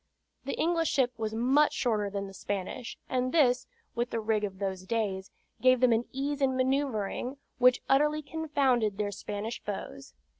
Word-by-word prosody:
The - - -2
English 330 -1 +1
ship 255 -3 +2
was 220 0 -2
much 265 +6 +3
shorter 215 -5 0
than 200 0 -3
the 195 - -9
Spanish; 205 +5 -4
and 255 0 0
this 255 -6 +3 0.3
(with 240 +1 -1
the 230 - -2
rig 215 -1 0
of 195 -2 -3
those 190 -1 -3
days) 195 -4 -1 0.3
gave 255 0 +5
them 250 -1 +5
an 225 +2 +1
ease 280 +2 -2
in 260 -1 +2
manoeuvring, 260 -2 -1 0.2
which 250 0 +5
utterly 300 +3 +3
confounded 275 -9 +1
their 205 -1 -1
Spanish 210 +3 -5
foes. 195 - -7
245 Hz, 165 wpm, -29 LUFS, 210-270 Hz, 0.3 s, gave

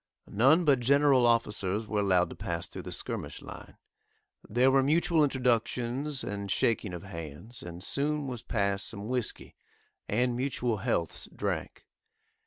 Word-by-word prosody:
None 135 - +4
but 140 -4 +4
general 135 0 +4
officers 105 -3 +1
were 105 -1 -1
allowed 90 -3 +2
to - - -8
pass 85 -1 -3
through - - -8
the - - -8
skirmish - - -4
line; - - -11 0.7
there 125 +5 +4
were 135 0 +5
mutual 160 +3 +3
introductions 130 +1 0
and 100 -1 -4
shaking 115 -2 +1
of 85 - -8
hands, 85 - -8
and 85 +1 -7
soon 145 +5 0
was 125 -4 -5
passed 100 -3 0
some 105 -1 -6
whiskey, 125 -3 -2 0.6
and 120 +3 +1
mutual 125 -3 -1
healths 100 -7 -2
drank. - - -3
120 Hz, 145 wpm, -29 LUFS, 100-135 Hz, 0.7 s, were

